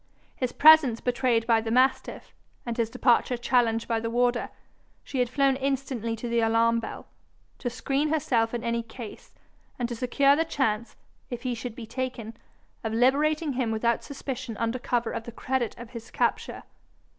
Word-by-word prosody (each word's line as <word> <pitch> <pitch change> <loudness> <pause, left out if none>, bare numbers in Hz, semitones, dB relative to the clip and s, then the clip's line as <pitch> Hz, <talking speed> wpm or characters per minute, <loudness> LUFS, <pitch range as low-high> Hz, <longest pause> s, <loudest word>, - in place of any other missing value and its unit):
His 255 -2 -2
presence 300 -6 +6
betrayed 245 -2 +1
by 230 -1 +3
the 225 - -4
mastiff, 260 +3 +1 0.3
and 235 -1 -3
his 230 -1 0
departure 245 +1 +2
challenged 235 -2 +1
by 230 -1 0
the 230 0 -3
warder, 240 +1 +1 0.5
she 270 - -4
had 245 -1 +2
flown 275 +1 +2
instantly 265 -4 -2
to 235 +2 -6
the 235 0 +1
alarm 230 +1 +3
bell, 225 - -7 0.5
to 245 - -2
screen 275 +4 -1
herself 245 -7 +1
in 235 - -4
any 235 0 0
case, 230 -1 -11 0.4
and 240 - -1
to 240 - -5
secure 275 +4 +3
the 320 - +2
chance, 235 -8 -1 0.3
if 245 0 -6
he 255 -2 -1
should 235 0 -6
be 240 - -7
taken, 235 -2 -5 0.5
of 220 -1 -2
liberating 290 +5 +2
him 250 -2 -1
without 225 +1 0
suspicion 265 -5 -6
under 230 +2 -1
cover 240 -1 -1
of 230 - -5
the 235 - -7
credit 245 0 -2
of 235 -1 -10
his 230 -1 -9
capture. - - -1
240 Hz, 175 wpm, -27 LUFS, 230-265 Hz, 0.5 s, presence